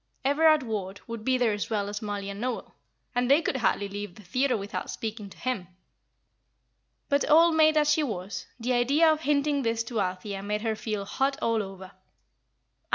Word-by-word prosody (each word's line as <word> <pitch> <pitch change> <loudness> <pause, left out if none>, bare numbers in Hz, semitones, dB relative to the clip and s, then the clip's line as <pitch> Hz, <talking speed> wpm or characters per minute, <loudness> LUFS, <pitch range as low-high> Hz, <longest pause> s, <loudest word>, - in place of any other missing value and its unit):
Everard 310 +1 +4
Ward 200 -4 -4
would 230 -2 -6
be 255 +2 +2
there 240 -4 +2
as 205 - -3
well 205 -3 -1
as 205 0 -4
Mollie 205 -2 -4
and 200 +1 -7
Noel, 250 -1 -3 0.4
and 245 0 +1
they 280 +3 +7
could 310 -4 -1
hardly 205 -4 +1
leave 205 -2 -6
the 215 - -14
theatre 255 +7 +1
without 200 0 -5
speaking 215 -2 -5
to - - -15
him. 245 -8 -3 1.4
But, 285 +1 +1
old 330 +2 +6
maid 310 -1 +5
as 300 0 +4
she 310 - +3
was, 200 -8 -4
the 245 +2 0
idea 280 +7 +4
of 310 0 -1
hinting 290 -1 +1
this 230 -2 0
to 225 -2 -2
Althea 190 +2 -3
made 210 +2 -2
her 220 -1 0
feel 215 -2 -3
hot 270 +6 0
all 230 -1 +1
over. 190 -1 -8
230 Hz, 190 wpm, -27 LUFS, 205-280 Hz, 1.4 s, they